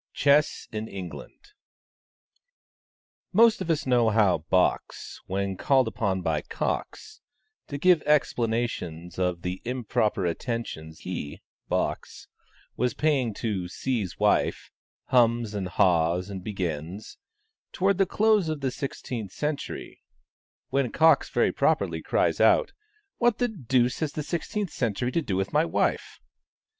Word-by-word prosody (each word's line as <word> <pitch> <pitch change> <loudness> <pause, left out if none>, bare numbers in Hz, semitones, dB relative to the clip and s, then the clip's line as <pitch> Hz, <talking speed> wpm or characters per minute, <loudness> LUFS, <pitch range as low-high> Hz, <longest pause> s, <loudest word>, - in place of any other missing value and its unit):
CHESS 145 +1 +2
IN 110 0 -4
ENGLAND. 95 - -9 1.8
Most 225 +1 +5
of 180 - -4
us 155 -3 +1
know 120 -3 +3
how 105 -6 +3
"Box," 90 +4 -1
when 95 0 -2
called 130 +5 +3
upon 95 -5 -1
by - - 0
"Cox," 435 0 -4 0.5
to 140 - -5
give 175 +2 +4
explanations 115 - -1
of 90 -2 -1
the 90 +1 -4
improper 115 -5 -1
attentions 85 -5 -4
he 85 -5 -6 0.3
(Box) - - -2 0.5
was 125 0 0
paying 140 -7 +1
to 100 -6 -2
C.'s 105 -1 -3
wife, - - +1 0.4
hums 115 -3 +3
and 100 -3 -3
haws 90 +1 +2
and 95 -2 -6
begins, 90 -1 -5 0.5
"Towards 195 +1 +1
the 195 - +4
close 215 -5 +3
of 155 -2 -3
the 135 -1 0
sixteenth 120 -6 -5
century;" 150 +4 -4 0.7
when 135 -4 0
Cox 160 0 +4
very - - +2
properly - - +1
cries - - +1
out, - - +4 0.5
"What 240 -3 +3
the 245 - +1
deuce 130 - 0
has 155 -3 -2
the 150 - -3
sixteenth 180 +4 -3
century 120 +1 -1
to 165 - +1
do 105 -11 -3
with 95 +1 -2
my - - +4
wife?" - - -1
115 Hz, 130 wpm, -26 LUFS, 95-150 Hz, 1.8 s, Most